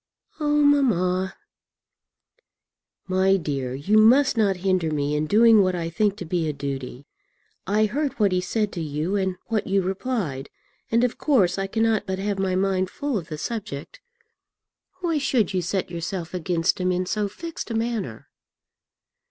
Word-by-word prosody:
"Oh, 295 -1 +2
mamma!" 190 -10 +2 1.7
"My 190 +1 +3
dear, 135 -7 -3
you 200 +11 +3
must 255 +6 +5
not 205 -4 +2
hinder 185 -4 +2
me 145 -1 -1
in 150 +1 -1
doing 220 +3 +6
what 185 -1 +1
I 165 -1 -3
think 205 +4 +1
to 180 - -6
be 165 -1 -1
a - - -2
duty. 135 -1 -6 0.6
I 210 +2 +3
heard 275 +5 -1
what 205 -3 +3
he 180 0 +1
said 210 +3 -1
to 170 - -5
you 155 +5 -2
and 190 -2 0
what 220 -2 -1
you 195 -1 +2
replied, 190 - -3 0.4
and 230 +1 +2
of 250 - -1
course 195 - +2
I 195 - -1
cannot 220 0 +1
but 190 0 -2
have 200 0 -2
my 190 -1 0
mind 190 -1 +1
full 285 +2 -3
of 180 -7 -3
the 155 - -6
subject. 190 -8 -6 1.0
Why 335 -4 0
should 260 -7 +1
you 185 - +1
set 180 +1 -2
yourself 170 +1 -4
against 180 +1 0
him 180 0 +1
in 180 0 0
so 210 +2 -1
fixed 330 +9 -7
a 230 - -3
manner?" 225 - -3
190 Hz, 170 wpm, -24 LUFS, 175-225 Hz, 1.7 s, doing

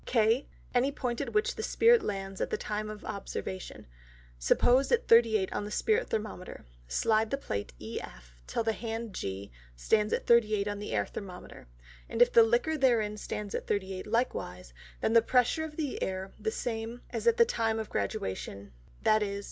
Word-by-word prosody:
K, 230 +2 +2 0.3
any 255 +3 +3
Point 250 -3 -3
at 280 - -3
which 445 +4 +1
the - - -5
Spirit 465 0 +4
stands 195 - -4
at - - 0
the - - -1
time 215 0 -3
of 215 0 -8
Observation; 190 -1 -6 0.5
suppose 245 - +3
at 480 - +2
38 225 -4 +5
on - - -2
the 205 - -5
Spirit 440 - +1
Thermometer; 210 -4 -5 0.2
Slide 215 - +2
the 275 - -1
Plate 100 - -4
EF - - -8
till - - -1
the 225 0 +1
Hand 225 -1 -5
G 100 - -5 0.2
stand 210 - +1
at - - -1
38 215 -3 +4
on 205 0 -3
the 210 - -6
Air 105 -2 +1
Thermometer, 180 - -9 0.4
and 230 - -4
if 245 0 +6
the 230 - +9
Liquor 240 +8 +2
therein 230 -6 +3
stand 210 -1 -5
at - - -3
38 190 -1 -2
likewise, 90 - -2 0.3
then - - +1
is 230 - +6
the - - +7
pressure 250 +7 +2
of 310 -1 -7
the 300 -4 -3
Air 190 0 -3
the 440 - -1
same 230 - -4
as - - -3
at 470 0 +5
the 470 - +7
time 225 - 0
of 220 -1 -5
Graduation, 100 0 -3 0.3
_viz. 210 -2 +2
220 Hz, 185 wpm, -30 LUFS, 195-245 Hz, 0.5 s, the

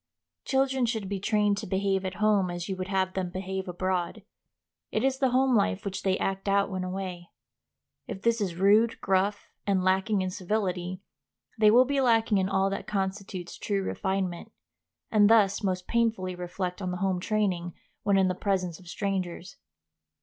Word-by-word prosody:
Children 265 -2 +1
should 220 -4 -2
be 200 0 -3
trained 205 0 +1
to 215 - -6
behave 195 0 0
at 185 0 -3
home 210 -3 +2
as 175 0 -4
you 190 - -2
would 185 0 -4
have 190 -1 0
them 185 -2 -2
behave 190 +1 -4
abroad. 185 +3 -2 0.7
It - - 0
is 265 0 +1
the 265 -2 +3
home 260 0 +3
life 95 - +1
which 195 -1 -3
they 190 -1 +1
act 195 +1 -2
out 200 0 +2
when 185 -1 -3
away. 185 -2 -5 0.8
If 205 -2 -7
this 235 -1 +2
is 185 -4 -1
rude, 210 +5 +4
gruff, 195 +2 0 0.2
and 190 -2 +2
lacking 190 +2 +2
in 185 - -2
civility, 185 -1 -2 0.6
they 215 -1 +6
will 245 +4 +6
be 280 +1 +1
lacking 225 -4 +3
in 190 0 0
all 195 0 +1
that 195 - -4
constitutes 190 -2 -4
true 200 -2 -1
refinement, 190 +1 -2 0.6
and 210 -1 +5
thus 210 -3 +4
most 185 -3 -1
painfully 225 -6 0
reflect 180 +1 -4
on 185 - -2
the 180 - -3
home 190 -1 0
training 185 -4 -1 0.3
when 200 -1 +2
in 190 -1 +4
the 185 - +1
presence 185 -3 -1
of 180 - -16
strangers. 185 -1 -3
195 Hz, 180 wpm, -28 LUFS, 185-210 Hz, 0.8 s, they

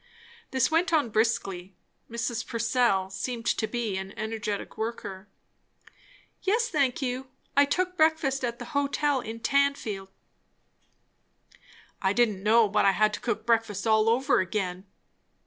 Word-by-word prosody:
This 260 0 +1
went 335 +3 +2
on 295 -8 +2
briskly; 195 -4 -1 0.3
Mrs. 235 0 -2
Purcell 230 -5 +1
seemed 235 +3 -4
to 220 -1 +1
be 230 -5 -2
an 190 +1 -7
energetic 215 -2 -4
worker. 210 -3 -5 1.1
"Yes, 455 +5 +1
thank 280 -5 +1
you. 255 +1 -3 0.3
I 285 - +6
took 365 +5 -1
breakfast 315 -4 +2
at 235 -1 -2
the - - -7
hotel 285 0 +1
in 225 0 -7
Tanfield." 275 -8 0 1.9
"I 190 0 +2
didn't 215 -4 +2
know 220 +2 +5
but 210 +1 +2
I 195 - +5
had 215 +2 +2
to - - -3
cook 235 -2 -3
breakfast 225 -3 +1
all 220 0 +4
over 255 +4 +3
again." 185 0 -2
230 Hz, 135 wpm, -27 LUFS, 210-270 Hz, 1.9 s, I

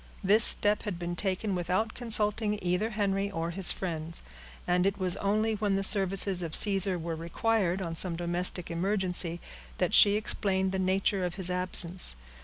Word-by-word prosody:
This 210 +4 +5
step 210 +1 +3
had 205 -5 -6
been 175 0 -5
taken 195 +2 -3
without 185 +5 -2
consulting 215 -2 +2
either 180 +5 -1
Henry 200 -2 -2
or 165 -3 -4
his 190 +1 +2
friends; 165 -3 -5 0.4
and 180 +1 +1
it 200 0 -2
was 185 -2 -1
only 215 +2 -1
when 205 -2 -1
the 195 - -2
services 195 -1 +2
of 165 -2 -3
Caesar 195 -2 +2
were 165 -1 -5
required 185 +3 -2
on 165 -2 -5
some 170 +1 -1
domestic 175 +1 0
emergency, 180 -1 0 0.4
that - - -1
she 205 0 +6
explained 190 -3 -2
the 190 - -3
nature 190 +1 0
of 180 -1 -4
his 185 -2 -3
absence. 180 - +2
190 Hz, 170 wpm, -28 LUFS, 175-205 Hz, 0.4 s, she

